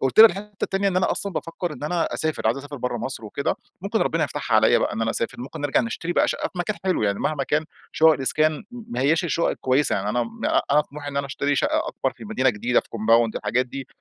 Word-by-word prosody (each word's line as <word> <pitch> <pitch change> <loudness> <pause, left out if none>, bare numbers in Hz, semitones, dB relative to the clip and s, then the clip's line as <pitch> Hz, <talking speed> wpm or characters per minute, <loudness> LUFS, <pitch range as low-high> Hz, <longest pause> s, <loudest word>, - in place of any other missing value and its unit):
قُلت 135 +10 +4
لها 225 - +13
الحتة 205 +1 -9
التانية، 195 +1 0
إن 185 - -1
أنا 185 - +2
أصلًا 200 - -2
بافكّر 165 0 -4
إن - - -10
أنا 170 +2 -1
أسافر، 155 -7 -1
عايز 115 +4 +2
أسافر 145 +1 -8
برّه 125 -1 -2
مصر 115 -1 -5
وكده، 105 - -2 0.2
ممكن - - -1
ربنا - - +1
يفتحها - - -2
عليَّ - - +5
بقى - - 0
إن 115 - -2
أنا 115 - +1
أسافر، 115 - -3
ممكن 130 +3 -7
نرجع 145 -1 +2
نشتري 175 -7 -3
بقى - - +3
شقة - - -1
في 180 - -9
مكان 205 +4 -1
حلو 185 -9 +1
يعني، 100 -1 +1
مهما 150 -3 0
كان 150 +4 0 0.3
شقق 160 0 +6
الإسكان 155 +2 0
ما 240 -1 -6
هياش 160 +6 +2
الشقق 170 0 +1
الكويّسة، 130 +3 +1
يعني 100 +1 -2
أنا 120 +3 +1 0.2
أ - - +3
أنا 150 - +6
طموحي 145 0 -7
إن 140 - -6
أنا 140 - 0
أشتري 140 +1 -1
شقّة - - +1
أكبر - - -2
في - - -11
مدينة 130 0 +2
جديدة، 120 +3 +1
في - - -21
compound، 115 +1 +3
الحاجات 125 +1 0
دي. 135 +1 -7
145 Hz, 250 wpm, -24 LUFS, 125-170 Hz, 0.3 s, لها